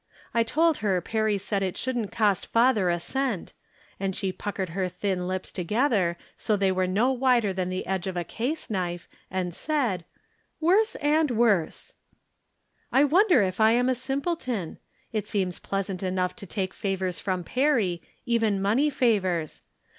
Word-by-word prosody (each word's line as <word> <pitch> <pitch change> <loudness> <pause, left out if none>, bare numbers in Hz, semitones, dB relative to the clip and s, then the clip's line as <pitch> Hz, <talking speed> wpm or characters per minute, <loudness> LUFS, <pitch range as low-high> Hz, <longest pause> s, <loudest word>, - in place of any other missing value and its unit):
I 230 - +3
told 315 +7 +2
her 195 -4 +1
Perry 215 +3 0
said 200 0 -2
it 190 -2 -2
shouldn't 245 -5 -2
cost 205 -4 +1
father 230 -5 +3
a 175 - +2
cent, 255 -1 -2 0.5
and 190 -1 -2
she 190 -2 -1
puckered 195 -1 -4
her 185 +2 -2
thin 180 0 -2
lips 185 0 -3
together 195 - +1 0.2
so 215 -2 0
they 195 -1 +2
were 185 0 +1
no 215 +8 +2
wider 245 -6 +2
than 185 -1 -2
the 185 0 -3
edge 190 0 -2
of 185 -1 -3
a 175 - 0
case 260 - -3
knife, 175 -3 -2 0.2
and 180 -2 -2
said: 245 - -1 0.3
" - - -44
Worse 395 +7 +3
and 300 +1 +2
worse! 220 -9 +1 0.5
" - - -49 0.3
I 270 - +5
wonder 340 - +5
if 185 +1 -2
I 220 +1 +6
am 245 +2 +3
a - - +3
simpleton? 260 - -3 0.3
It 215 -3 -2
seems 185 -4 -1
pleas 195 -1 -2
ant 185 - -4
enough 185 -1 -1
to 200 -4 -8
take 190 0 -2
favors 190 -3 -2
from 185 -2 -2
Perry, 230 - +1 0.2
even 225 -5 +1
money 225 +10 +2
favors. 195 - 0
205 Hz, 170 wpm, -26 LUFS, 185-250 Hz, 0.5 s, I